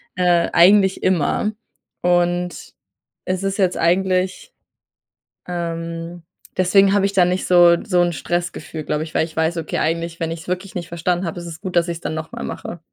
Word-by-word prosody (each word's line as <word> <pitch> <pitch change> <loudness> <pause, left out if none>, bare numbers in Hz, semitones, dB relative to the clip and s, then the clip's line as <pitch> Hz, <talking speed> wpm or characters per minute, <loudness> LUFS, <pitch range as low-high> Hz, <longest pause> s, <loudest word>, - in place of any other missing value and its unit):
äh, 175 -2 +2
eigentlich 190 +2 +5
immer. 185 +4 +1 0.5
Und, 175 0 0 0.5
es 185 0 -1
ist 195 0 -1
jetzt 185 -3 +1
eigentlich, 185 - 0 0.9
ähm 170 -1 -5 0.3
deswegen 195 +2 +4
habe 200 -1 +3
ich 200 - -1
da 185 -2 +5
nicht 180 +1 -1
so 175 -1 +6
so 180 -4 +2
'n 175 0 +2
Stressgefühl, 170 -1 -4
glaube 150 +1 -2
ich, 160 - -10
weil - - +3
ich 160 - -13
weiß, 160 +2 0
okay, 160 -2 -3
eigentlich, 165 +1 -2
wenn 165 0 -2
ich 165 - -5
es - - -15
wirklich 185 +2 -4
nicht 170 -2 -5
verstanden 175 +2 -1
habe, 170 +1 -4
ist 175 - -8
es 170 +2 -9
gut, 185 -3 -5
dass 175 0 +3
ich 170 - -3
es - - -17
dann - - -3
nochmal 160 0 -6
mache. 170 - -6
175 Hz, 190 wpm, -20 LUFS, 165-185 Hz, 0.9 s, so